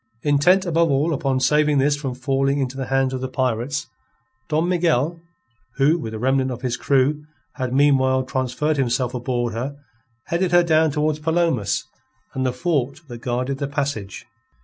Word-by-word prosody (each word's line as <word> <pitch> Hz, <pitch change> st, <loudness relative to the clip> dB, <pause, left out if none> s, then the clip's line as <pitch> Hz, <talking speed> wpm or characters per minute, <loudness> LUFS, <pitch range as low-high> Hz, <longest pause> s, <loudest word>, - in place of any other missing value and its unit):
Intent 155 Hz, +7 st, +3 dB
above 170 Hz, -1 st, +2 dB
all 145 Hz, +4 st, +1 dB
upon 135 Hz, -3 st, 0 dB
saving 150 Hz, +2 st, +3 dB
this 145 Hz, +2 st, +3 dB
from 135 Hz, -4 st, -4 dB
falling 135 Hz, +2 st, 0 dB
into 135 Hz, -2 st, -2 dB
the 135 Hz, -2 st, -4 dB
hands 135 Hz, 0 st, +1 dB
of 130 Hz, -, -3 dB
the 130 Hz, -, -2 dB
pirates, 130 Hz, +4 st, -1 dB, 0.6 s
Don 160 Hz, +3 st, +1 dB
Miguel, 165 Hz, -2 st, +1 dB, 0.5 s
who, 150 Hz, +5 st, +3 dB
with 110 Hz, -6 st, -5 dB
a -, -, -4 dB
remnant 130 Hz, +3 st, +1 dB
of 125 Hz, 0 st, -6 dB
his 125 Hz, -2 st, -1 dB
crew, 140 Hz, +3 st, +1 dB, 0.3 s
had 130 Hz, -3 st, -2 dB
meanwhile 130 Hz, -1 st, +3 dB
transferred 130 Hz, +4 st, -1 dB
himself 125 Hz, -1 st, 0 dB
aboard 120 Hz, -2 st, -2 dB
her, 130 Hz, +5 st, -4 dB, 0.5 s
headed 175 Hz, +1 st, -1 dB
her 175 Hz, 0 st, +6 dB
down 160 Hz, -1 st, +3 dB
towards 150 Hz, +1 st, 0 dB
Palomas 160 Hz, -, 0 dB, 0.5 s
and 130 Hz, -, -2 dB
the -, -, +1 dB
fort 140 Hz, +1 st, -1 dB
that 120 Hz, -1 st, -8 dB
guarded 125 Hz, +3 st, -2 dB
the 140 Hz, -, -2 dB
passage. 140 Hz, -9 st, -4 dB
135 Hz, 170 wpm, -22 LUFS, 130-150 Hz, 0.6 s, her